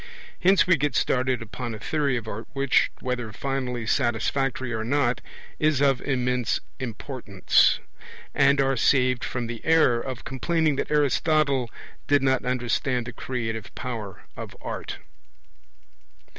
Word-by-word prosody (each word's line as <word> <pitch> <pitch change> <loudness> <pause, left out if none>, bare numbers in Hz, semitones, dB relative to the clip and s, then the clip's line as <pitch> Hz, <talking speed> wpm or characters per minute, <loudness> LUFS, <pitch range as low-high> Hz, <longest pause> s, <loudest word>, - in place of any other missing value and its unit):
Hence 190 +2 +5
we 180 -2 +4
get 145 +1 -1
started 125 -2 +1
upon 115 +1 -6
a - - -9
theory 140 0 0
of 115 -2 -6
art 110 +2 -6
which, 135 -1 +3
whether 125 -3 -3
finally 125 -1 -3
satisfactory 130 +1 0
or 110 0 -2
not, 125 -1 +1 0.4
is 155 -3 +2
of 135 -3 +3
immense 125 -3 0 0.2
importance, 120 -4 +1 0.6
and 140 0 +4
are 135 0 +2
saved 125 0 +2
from 125 -1 -3
the 115 -1 -6
error 155 -8 +4
of 130 -3 -6
complaining 155 +2 0
that - - -2
Aristotle 145 -3 +2 0.4
did 145 -2 +3
not 130 -1 +2
understand 125 0 0
the 125 - -7
'creative 115 -4 -4
power' 110 -7 -6
of - - -8
art. - - -5
130 Hz, 135 wpm, -25 LUFS, 120-140 Hz, 0.6 s, Hence